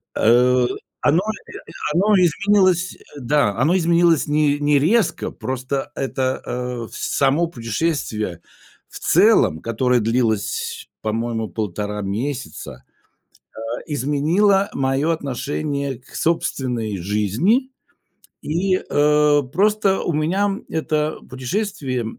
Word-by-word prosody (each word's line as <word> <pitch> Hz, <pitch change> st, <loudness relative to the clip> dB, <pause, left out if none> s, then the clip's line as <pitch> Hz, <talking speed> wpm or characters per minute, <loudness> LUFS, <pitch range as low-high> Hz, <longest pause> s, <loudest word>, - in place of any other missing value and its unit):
Э, 125 Hz, +2 st, +4 dB, 0.3 s
оно, 160 Hz, +5 st, +3 dB
э, 220 Hz, +1 st, -6 dB, 0.4 s
оно 205 Hz, +5 st, +3 dB
изменилось, 185 Hz, +1 st, +2 dB
э, 145 Hz, -, -14 dB
да, 130 Hz, -4 st, +2 dB
оно 150 Hz, +9 st, +3 dB
изменилось 170 Hz, -2 st, +3 dB
не 150 Hz, -1 st, +2 dB
не 145 Hz, -1 st, +3 dB
резко, 210 Hz, +10 st, +1 dB
просто 130 Hz, +2 st, -4 dB
это, 130 Hz, -1 st, -2 dB
э, 125 Hz, -2 st, -4 dB
с -, -, -3 dB
само 145 Hz, +5 st, +3 dB
путешествие 115 Hz, -, -3 dB, 0.5 s
в -, -, -10 dB
целом, 80 Hz, -, +4 dB
которое 120 Hz, +5 st, +1 dB
длилось, 115 Hz, -2 st, -1 dB
по-моему, 115 Hz, +1 st, -2 dB
1,5 105 Hz, +2 st, -3 dB
месяца, 120 Hz, +8 st, -5 dB, 0.8 s
а, -, -, -6 dB, 0.2 s
изменило 160 Hz, -, +2 dB
моё 135 Hz, +3 st, 0 dB
отношение 140 Hz, -1 st, -3 dB
к 130 Hz, -, -20 dB
собственной 125 Hz, -, -1 dB
жизни, 105 Hz, -, +1 dB, 0.7 s
и, 185 Hz, +5 st, 0 dB
э, 150 Hz, -2 st, +3 dB
просто 200 Hz, +1 st, +2 dB
у 170 Hz, -, -1 dB
меня 190 Hz, +7 st, 0 dB
это 155 Hz, -1 st, -1 dB
путешествие 130 Hz, -, -3 dB
145 Hz, 105 wpm, -21 LUFS, 120-170 Hz, 0.8 s, Э